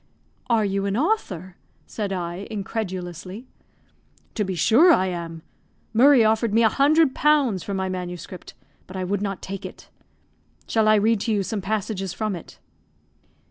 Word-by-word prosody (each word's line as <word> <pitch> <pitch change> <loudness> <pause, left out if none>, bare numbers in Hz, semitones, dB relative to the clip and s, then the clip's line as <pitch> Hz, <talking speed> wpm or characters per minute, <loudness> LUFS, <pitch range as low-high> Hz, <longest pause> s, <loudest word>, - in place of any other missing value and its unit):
"Are 225 -3 +3
you 195 0 -1
an 200 +2 -1
author," 200 - -1 0.3
said 205 -3 -4
I, 180 +1 -4
incredulously. 190 -1 -5 0.9
"To 215 - -1
be 190 -2 -3
sure 255 - +5
I 190 - +4
am. 170 -3 -5 0.5
Murray 255 +1 +6
offered 220 0 +1
me 230 - +5
100 280 +5 +4
pounds 285 -11 +2
for 200 - -4
my 190 0 -1
manuscript, 180 0 -7 0.3
but 185 - -8
I 185 - -2
would 195 +2 -1
not 195 -2 -4
take 195 0 -6
it. - - -10 0.8
Shall 220 -1 +1
I 215 - +6
read 220 +1 +3
to 225 - -2
you 205 -2 +1
some 210 +1 -3
passages 195 -2 -3
from 215 -3 -2
it?" 170 - -11
200 Hz, 155 wpm, -23 LUFS, 185-225 Hz, 0.9 s, Murray